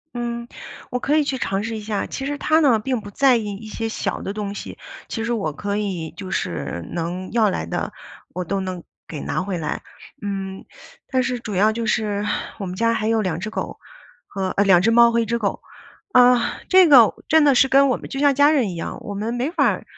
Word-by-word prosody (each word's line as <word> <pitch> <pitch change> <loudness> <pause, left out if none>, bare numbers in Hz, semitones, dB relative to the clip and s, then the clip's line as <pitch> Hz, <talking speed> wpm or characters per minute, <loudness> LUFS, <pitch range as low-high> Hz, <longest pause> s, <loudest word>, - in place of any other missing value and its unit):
嗯， 235 0 -4 0.4
我 250 - -1
可 295 +4 +1
以 300 - +3
去 270 -2 -2
尝 195 -3 -1
试 225 +1 -4
一 215 - -5
下。 210 -1 -2
其 270 - -6
实 290 +1 -2
他 310 +2 +3
呢， 275 -8 +4
并 240 +2 -2
不 205 - -9
在 265 +5 +4
意 225 -2 -1
一 215 +2 -10
些 225 +1 -4
小 - - -3
的 195 - -4
东 205 -1 -4
西。 - - -8 0.3
其 225 - -4
实 240 - -1
我 195 -9 -1
可 200 +7 -4
以， 190 -6 -3
就 190 -2 -7
是 85 - -3
能 175 +2 -4
要 220 -3 +3
来 - - -2
的， - - -3 0.4
我 180 0 -4
都 195 +3 -1
能 185 -2 -5 0.2
给 155 - -6
拿 - - -2
回 185 -1 -3
来， 155 -2 -3 0.4
嗯， 195 -1 -5 0.5
但 260 -1 +1
是 250 -1 -2
主 215 -5 -6
要 210 +4 +4
就 230 0 -3
是 210 -1 0 0.4
我 195 - -4
们 180 - -5
家 230 +3 +2
还 220 -1 -1
有 225 -1 +2
2 175 -3 -2
只 210 +4 -4
狗 - - -5 0.5
和， 190 -1 -3
呃， 200 - +2
2 190 -3 +6
只 225 - +4
猫， 235 0 +6
和 235 - +2
1 230 - +1
只 235 +2 -1
狗。 200 -3 -2 0.5
啊， 250 -1 +4
这 370 -2 +7
个 250 -7 +8 0.2
真 315 -1 +5
的 280 -3 +5
是 265 - +5
跟 275 +1 +5
我 255 - +1
们 - - -10
就 270 - -5
像 285 -1 +4
家 285 +2 +5
人 265 -9 +2
一 180 - -6
样， 165 - -5
我 205 - -6
们 215 +4 -3
没 245 +5 -1
法 350 - +1
儿 - - -5
220 Hz, 245 characters per minute, -22 LUFS, 195-250 Hz, 0.5 s, 个